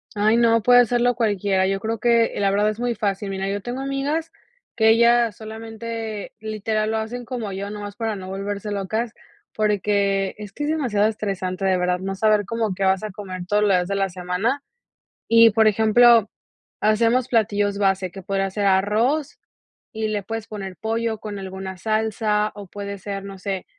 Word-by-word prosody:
Ay, 215 Hz, +3 st, +3 dB
no, 230 Hz, -1 st, +4 dB
puede 245 Hz, +2 st, +7 dB
hacerlo 245 Hz, 0 st, +2 dB
cualquiera. 200 Hz, -4 st, +1 dB
Yo 195 Hz, 0 st, 0 dB
creo 225 Hz, +2 st, -2 dB
que, 235 Hz, 0 st, +3 dB
la 200 Hz, -1 st, +2 dB
verdad 205 Hz, +1 st, +2 dB
es 215 Hz, +2 st, -5 dB
muy 245 Hz, -1 st, 0 dB
fácil. 200 Hz, -1 st, -2 dB
Mira, 195 Hz, 0 st, -3 dB
yo 200 Hz, 0 st, -2 dB
tengo 245 Hz, +2 st, -4 dB
amigas 280 Hz, +4 st, -2 dB, 0.4 s
que 220 Hz, 0 st, +4 dB
ellas 235 Hz, -2 st, +4 dB
solamente, 225 Hz, -1 st, -6 dB
literal 215 Hz, 0 st, -2 dB
lo 220 Hz, -, 0 dB
hacen 240 Hz, +3 st, -4 dB
como 230 Hz, -5 st, -4 dB
yo 200 Hz, +2 st, -5 dB
nomás 205 Hz, -1 st, -7 dB
para 225 Hz, -1 st, -2 dB
no 185 Hz, -1 st, -8 dB
volverse 200 Hz, +2 st, -4 dB
locas, 215 Hz, +4 st, -2 dB, 0.4 s
porque 200 Hz, -2 st, +1 dB
es 210 Hz, -2 st, -9 dB
que 295 Hz, -, -3 dB
es -, -, -1 dB
demasiado 240 Hz, -10 st, +1 dB
estresante, 195 Hz, -3 st, -3 dB
de 190 Hz, -1 st, +3 dB
verdad, 180 Hz, 0 st, +1 dB
no 195 Hz, +1 st, -3 dB
saber 210 Hz, 0 st, +2 dB
como 225 Hz, -4 st, -2 dB
que 195 Hz, -, -2 dB
vas 190 Hz, +1 st, +2 dB
a 215 Hz, -, -3 dB
comer 185 Hz, -3 st, -7 dB
todos 210 Hz, +2 st, +2 dB
los 205 Hz, -, +3 dB
días 180 Hz, -1 st, +2 dB
de 200 Hz, -, -2 dB
la 195 Hz, -1 st, 0 dB
semana. 185 Hz, +10 st, -2 dB, 0.7 s
Y, 230 Hz, 0 st, +7 dB
por 220 Hz, +1 st, +4 dB
ejemplo, 220 Hz, +1 st, +5 dB, 0.5 s
hacemos 230 Hz, +4 st, +2 dB
platillos 205 Hz, -3 st, +1 dB
base 195 Hz, -2 st, +1 dB
que 195 Hz, +1 st, -10 dB
podría 195 Hz, 0 st, -1 dB
ser 200 Hz, +1 st, -1 dB
arroz, 215 Hz, +10 st, +1 dB, 0.5 s
y 220 Hz, 0 st, -2 dB
le 205 Hz, -2 st, -2 dB
puedes 225 Hz, 0 st, -5 dB
poner 195 Hz, -4 st, -7 dB
pollo 225 Hz, 0 st, -2 dB
con 210 Hz, -2 st, -6 dB
alguna 190 Hz, 0 st, -6 dB
salsa, 215 Hz, 0 st, 0 dB
o 200 Hz, -2 st, -9 dB
puede 200 Hz, +1 st, -6 dB
ser, 195 Hz, 0 st, -6 dB
no 195 Hz, -1 st, -9 dB
sé, 190 Hz, 0 st, -4 dB
210 Hz, 185 wpm, -22 LUFS, 195-225 Hz, 0.7 s, puede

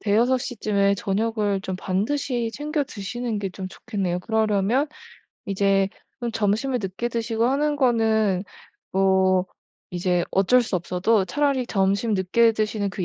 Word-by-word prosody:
5-6 235 Hz, +5 st, +2 dB
시쯤에 200 Hz, -5 st, 0 dB
저녁을 205 Hz, 0 st, -1 dB
좀 190 Hz, -1 st, -4 dB
반드시 230 Hz, +5 st, -1 dB
챙겨 295 Hz, 0 st, -1 dB
드시는 225 Hz, +1 st, -4 dB
게 195 Hz, -2 st, -3 dB
좀 185 Hz, 0 st, -6 dB
좋겠네요. 190 Hz, -6 st, -3 dB
그러려면 220 Hz, +6 st, +1 dB, 0.6 s
이제 195 Hz, 0 st, +2 dB, 0.3 s
좀 235 Hz, -1 st, -3 dB
점심을 225 Hz, +4 st, 0 dB
늦게 195 Hz, +6 st, -3 dB
드시고 230 Hz, -1 st, -1 dB
하는 290 Hz, +3 st, +1 dB
거는 220 Hz, -7 st, +2 dB, 0.5 s
뭐 190 Hz, -1 st, +3 dB, 0.4 s
이제 180 Hz, 0 st, 0 dB
어쩔 195 Hz, +7 st, +4 dB
수 215 Hz, -, -4 dB
없어도 185 Hz, +4 st, +1 dB
차라리 280 Hz, 0 st, 0 dB
점심 200 Hz, +3 st, +1 dB
늦게 225 Hz, +5 st, +3 dB
드시는 215 Hz, -2 st, -1 dB
그 185 Hz, -2 st, -4 dB
210 Hz, 275 characters per minute, -24 LUFS, 195-240 Hz, 0.6 s, 어쩔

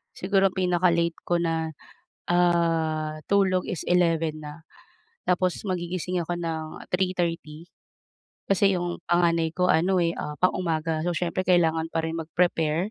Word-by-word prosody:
Siguro 195 Hz, +1 st, +2 dB
pinaka-late 175 Hz, -2 st, +1 dB
ko 175 Hz, -, +2 dB
na, 160 Hz, -2 st, -2 dB, 0.5 s
ah, 165 Hz, -3 st, +1 dB
tulog 190 Hz, -2 st, +2 dB
is 180 Hz, -6 st, -4 dB
11:00 165 Hz, -3 st, +1 dB
na. 150 Hz, +1 st, -10 dB, 0.6 s
Tapos 180 Hz, 0 st, 0 dB
magigising 180 Hz, -1 st, -3 dB
ako 175 Hz, -, -2 dB
ng 160 Hz, -1 st, -4 dB
3:30. 170 Hz, -3 st, -2 dB, 0.8 s
Kasi 195 Hz, 0 st, +4 dB
iyong 175 Hz, -1 st, -3 dB
panganay 170 Hz, -1 st, +2 dB
ko 180 Hz, 0 st, +2 dB
ano 180 Hz, +2 st, +3 dB
eh, 165 Hz, -, +2 dB
ah, 150 Hz, -, -4 dB
pang-umaga, 165 Hz, -3 st, 0 dB
so 175 Hz, -, 0 dB
siyempre 175 Hz, +2 st, -2 dB
kailangan 165 Hz, -3 st, +3 dB
pa 165 Hz, -, +1 dB
rin 160 Hz, +1 st, -3 dB
mag-prepare, 165 Hz, +2 st, 0 dB
170 Hz, 130 wpm, -25 LUFS, 160-180 Hz, 0.8 s, Kasi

